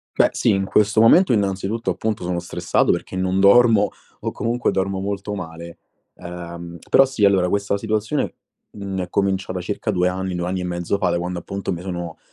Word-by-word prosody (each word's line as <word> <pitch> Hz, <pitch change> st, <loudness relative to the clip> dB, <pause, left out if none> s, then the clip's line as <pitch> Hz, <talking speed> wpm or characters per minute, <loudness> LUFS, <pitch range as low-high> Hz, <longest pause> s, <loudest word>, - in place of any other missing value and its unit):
Beh, -, -, +5 dB
sì, -, -, +1 dB
in 95 Hz, -1 st, +1 dB
questo 105 Hz, +2 st, +3 dB
momento, 170 Hz, +9 st, +6 dB
innanzitutto, 100 Hz, +1 st, -1 dB
appunto, 110 Hz, -3 st, -2 dB
sono 90 Hz, 0 st, -2 dB
stressato 85 Hz, 0 st, 0 dB
perché -, -, -4 dB
non 95 Hz, +1 st, 0 dB
dormo 105 Hz, +1 st, +6 dB, 0.3 s
o -, -, -2 dB
comunque 120 Hz, +2 st, -1 dB
dormo 95 Hz, 0 st, -1 dB
molto 100 Hz, +1 st, -3 dB
male, 85 Hz, -2 st, -8 dB, 0.4 s
ehm, 85 Hz, 0 st, -8 dB
però, 135 Hz, -, +6 dB
sì, 130 Hz, -6 st, -1 dB
allora, 95 Hz, -2 st, +4 dB
questa 100 Hz, +1 st, 0 dB
situazione, 110 Hz, +6 st, -1 dB, 0.4 s
mhmm, 100 Hz, -2 st, -5 dB
è 90 Hz, -, -12 dB
cominciata 95 Hz, -1 st, -1 dB
circa 105 Hz, +4 st, -3 dB
2 90 Hz, -2 st, +1 dB
anni, 95 Hz, 0 st, -3 dB
2 90 Hz, 0 st, -2 dB
anni 95 Hz, 0 st, -2 dB
e 90 Hz, -, -4 dB
mezzo 90 Hz, +2 st, -2 dB
fa, 95 Hz, -3 st, +1 dB
da 85 Hz, 0 st, 0 dB
quando, 90 Hz, 0 st, -3 dB
appunto, 100 Hz, +3 st, -4 dB
mi 85 Hz, -, -5 dB
sono 85 Hz, -3 st, -5 dB
95 Hz, 190 wpm, -21 LUFS, 90-105 Hz, 0.4 s, momento